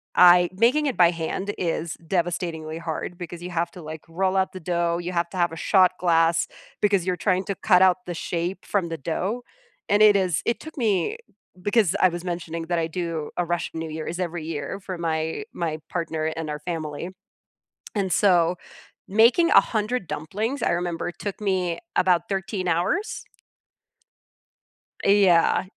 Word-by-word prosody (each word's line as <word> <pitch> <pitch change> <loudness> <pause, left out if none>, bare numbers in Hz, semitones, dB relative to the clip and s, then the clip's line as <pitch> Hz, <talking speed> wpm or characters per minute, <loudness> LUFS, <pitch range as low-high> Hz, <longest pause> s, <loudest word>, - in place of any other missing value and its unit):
I 175 0 +7
making 250 +9 +3
it 265 - -2
by 175 -1 +6
hand 175 +4 -3
is 165 -1 -2
devastatingly 165 -3 -2
hard 165 +1 -5
because 175 -1 -8
you 180 - -6
have 170 0 -1
to, 180 - -11
like, 155 0 -8
roll 190 +3 0
out 190 0 +1
the 185 - -7
dough, 170 0 0
you 175 +1 -4
have 170 -1 0
to 185 - -8
have 175 -1 +2
a 165 - -7
shot 185 +1 +4
glass, 165 -1 +3 0.3
because 200 -4 +2
you're 185 - 0
trying 185 -2 +2
to 200 - -3
cut 185 -3 +4
out 185 -1 +5
the 175 - -3
shape 175 +3 -3
from 190 -5 0
the 165 - -4
dough, 185 - -3 0.5
and 205 +1 +4
it 210 -1 +7
is 185 -5 +1
it 235 - 0
took 315 0 -11
me 220 - +1 0.4
because 205 -2 +2
I 185 - +5
was 175 0 -6
mentioning 170 -2 -4
that 175 0 0
I 165 - +1
do 165 -2 -4
a 175 - +2
Russian 170 -1 -3
New 160 - -4
Year, 155 0 -5
is 175 +2 -4
every 175 -3 -3
year 160 +4 -4
for 190 -1 -6
my 160 - -2
my 160 -2 -3
partner 165 -2 -2
and 160 0 -3
our 150 - -4
family, 155 0 -4 0.9
and 195 -3 -1
so 180 -2 +4 0.5
making 235 - +5
100 215 -1 +2
dumplings, 215 - -3
I - - +2
remember, 175 0 -2
took 200 +4 -6
me 185 -4 0 0.2
about 180 -2 +4
13 190 -1 -2
hours. 175 - 0 1.8
Uh, - - +3
yeah. 190 -5 +5
175 Hz, 175 wpm, -24 LUFS, 165-195 Hz, 1.8 s, I